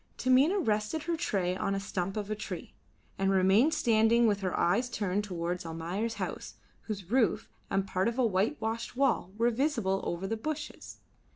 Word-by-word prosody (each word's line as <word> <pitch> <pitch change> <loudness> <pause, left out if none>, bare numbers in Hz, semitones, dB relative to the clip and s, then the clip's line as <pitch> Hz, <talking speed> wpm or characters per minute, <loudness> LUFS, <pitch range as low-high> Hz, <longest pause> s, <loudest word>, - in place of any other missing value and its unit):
Taminah 265 +9 +4
rested 220 - 0
her 340 0 -1
tray 185 - -1
on 195 +1 -1
a - - -1
stump 195 -1 -3
of 210 0 -3
a - - 0
tree, 210 - -7 0.5
and 195 0 +2
remained 195 +10 +4
standing 230 +1 +4
with 205 -3 +2
her 185 -2 -1
eyes 230 +9 +2
turned 205 -3 -1
towards 175 -2 -3
Almayer's 170 +8 -3
house, - - -5 0.3
whose 200 -3 -5
roof 235 -8 +2 0.2
and 195 0 +1
part 185 +1 0
of 235 +1 -2
a 255 - +3
whitewashed 225 +3 -1
wall 260 -9 +1
were 235 +2 +3
visible 230 -7 0
over 175 +2 -3
the 225 +3 -2
bushes. 305 +5 -6
210 Hz, 175 wpm, -30 LUFS, 190-240 Hz, 0.5 s, Taminah